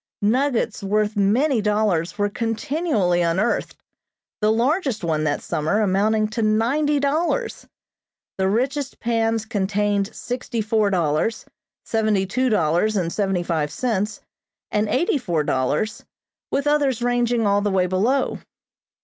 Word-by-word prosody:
Nuggets 235 0 +1
worth 210 +2 0
many 225 +6 +2
dollars 205 -4 0
were 205 0 +1
continually 225 - 0
unearthed, 175 +7 0 0.7
the 210 +1 +3
largest 255 - 0
one 155 -2 0
that 145 -1 -1
summer 155 +7 0
amounting 215 +2 +2
to 215 +2 -3
ninety 255 +8 +2
dollars. 325 - -1 0.7
The 190 - +2
richest 260 +6 -1
pans 225 -1 0
contained 205 -1 0
sixty 245 -1 -4
four 215 -1 +1
dollars, 175 +4 0 0.4
seventy 215 -3 +1
two 255 +7 0
dollars 180 +2 +1
and 170 -4 -1
seventy 195 -4 0
five 160 -4 -1
cents 215 -4 -2 0.5
and 210 0 0
eighty 285 +3 +1
four 175 - -1
dollars, 145 +11 -1 0.5
with 280 - -1
others 285 -5 +1
ranging 240 -1 +1
all 200 0 +3
the 205 - 0
way 190 -2 +2
below. 220 +9 0
215 Hz, 130 wpm, -22 LUFS, 195-245 Hz, 0.7 s, the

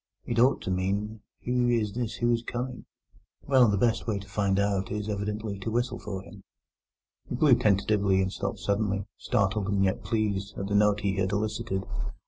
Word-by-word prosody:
It 115 -1 -1
ought 130 +3 +4
to - - -2
mean, 100 +4 -1 0.3
'Who 125 0 +2
is 110 -4 +1
this 120 -1 -3
who 120 0 +1
is 115 -1 +1
coming?' 125 +2 -5 0.6
Well, 130 -3 +5
the 105 -1 +2
best 115 +3 +1
way 110 -3 0
to 100 0 -8
find 100 -1 0
out 100 -1 0
is 105 0 -3
evidently 105 0 -3
to 100 - -3
whistle 120 +3 -1
for 95 -2 -5
him." - - -13 0.9
He - - -2
blew 140 +1 +5
tentatively 100 -3 +3
and 95 0 0
stopped - - -3
suddenly, 100 -1 -1
startled 105 -3 0
and 100 -1 +2
yet 95 -1 0
pleased 100 -3 -1
at 100 - -3
the 100 - -3
note 105 0 +4
he 100 -1 0
had 95 0 0
elicited. 105 -2 -2
105 Hz, 190 wpm, -28 LUFS, 100-115 Hz, 0.9 s, Well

